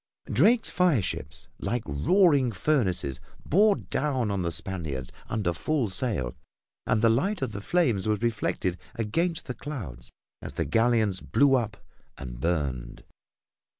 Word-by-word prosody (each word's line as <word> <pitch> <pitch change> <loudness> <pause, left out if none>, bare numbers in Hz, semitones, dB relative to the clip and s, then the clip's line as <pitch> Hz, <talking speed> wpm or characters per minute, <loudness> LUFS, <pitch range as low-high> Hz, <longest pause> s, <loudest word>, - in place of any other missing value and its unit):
Drake's 230 +1 +3
fire 175 - +3
ships, 75 -2 -5
like 120 -1 -2
roaring 140 - +3
furnaces, 95 - 0 0.3
bore 205 +5 +5
down 130 - -1
on 100 -2 -1
the 85 -1 -1
Spaniards 80 -8 -3 0.2
under 105 -5 0
full 130 - 0
sail, 90 - -2 0.5
and 105 - +2
the 115 - +6
light 175 - +1
of 125 - -2
the 100 -1 -6
flames 115 - +1
was 105 -1 +1
reflected 100 -5 -1 0.2
against 165 +10 -1
the 125 - -4
clouds 105 - -7 0.3
as - - -6
the - - -1
galleons 110 - +2
blew 140 -1 +3
up 115 -5 +1 0.4
and - - -7
burned. 70 -6 -2
110 Hz, 140 wpm, -27 LUFS, 85-140 Hz, 0.5 s, the